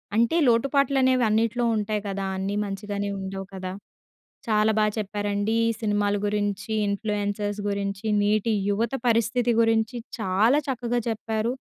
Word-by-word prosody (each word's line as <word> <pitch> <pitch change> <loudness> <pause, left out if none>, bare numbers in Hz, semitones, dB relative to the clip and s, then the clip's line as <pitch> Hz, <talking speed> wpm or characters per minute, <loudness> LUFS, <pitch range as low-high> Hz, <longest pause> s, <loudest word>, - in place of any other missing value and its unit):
అంటే 235 +7 +3
లోటుపాట్లు 275 +4 +2
అనేవి 255 -1 +3
అన్నిట్లో 230 +3 +1
ఉంటాయి 210 0 -1
కదా! 195 0 -3
అన్నీ 195 +2 -2
మంచిగానే 200 0 -4
ఉండవు 195 0 -5
కదా! 185 -1 -5 0.8
చాలా 215 0 +3
బాగా 215 -1 +2
చెప్పారండి 205 +1 -1
ఈ - - +2
సినిమాల 205 -1 +1
గురించి, 205 +1 -2 0.2
ఇన్ఫ్లుయెన్సర్స్ 205 0 -2
గురించి, 200 +1 -3 0.2
నేటి 215 +2 +2 0.2
యువత 225 +4 0 0.2
పరిస్థితి 235 +1 +2
గురించి 225 +1 +2 0.2
చాలా 215 +9 +3
చక్కగా 240 -1 -1
చెప్పారు. 225 +2 -2
215 Hz, 130 wpm, -25 LUFS, 205-230 Hz, 0.8 s, అంటే